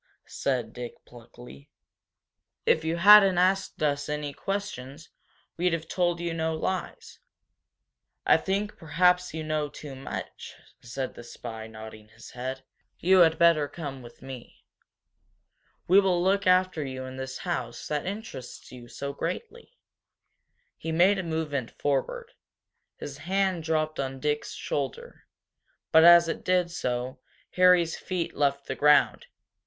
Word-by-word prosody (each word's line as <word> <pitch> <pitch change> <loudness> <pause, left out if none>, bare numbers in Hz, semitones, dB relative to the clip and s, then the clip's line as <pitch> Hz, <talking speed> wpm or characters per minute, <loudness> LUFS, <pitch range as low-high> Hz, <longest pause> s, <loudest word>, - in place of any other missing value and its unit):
said 130 -3 -2
Dick, 120 -1 -7
pluckily. 120 - -14 1.0
"If 160 - +3
you 160 +1 -1
hadn't 195 0 +8
asked 185 -2 +1
us 145 -1 0
any 150 -1 -3
questions, 165 -8 -5 0.5
we'd 175 0 +1
have 165 -1 -3
told 175 -1 0
you 170 -1 -3
no 160 -1 -1
lies." 185 +3 -4 1.1
"I - - +6
think 200 +2 -2
perhaps 180 +2 +2
you 160 - -4
know 155 -1 -2
too 145 0 -9
much," 135 +1 -7 0.3
said 130 +2 -5
the 120 - -11
spy, 110 -2 -8
nodding 110 -1 -11
his 115 +1 -14
head, 130 +2 -5 0.3
"You 185 +2 +4
had 165 -2 +5
better 165 -3 +4
come 140 -3 -7
with 120 0 -14
me. 130 -2 -11 1.2
We 190 +3 +7
will 180 -3 +2
look 195 +1 +1
after 185 -3 +3
you 130 -1 -6
in 130 0 -8
this 130 0 -5
house 125 -10 -4
that 150 +2 -2
interests 200 - -7
you 120 -1 -11
so 140 +3 -6
greatly." 470 - -6 1.0
He 160 - -4
made 185 +5 +4
a - - -2
movement 155 -7 -3
forward. 140 -2 -2 0.7
His 140 0 -8
hand 190 +1 0
dropped 155 -1 -1
on 135 -1 -3
Dick's 150 +1 -2
shoulder. 140 -3 -5 0.6
But 160 0 +7
as 170 0 +8
it 165 - -4
did 180 -1 +1
so 125 -4 -3 0.3
Harry's 180 -2 +4
feet 180 -3 -4
left 140 -1 0
the - - -3
ground. 150 - +3
155 Hz, 140 wpm, -27 LUFS, 130-180 Hz, 1.2 s, hadn't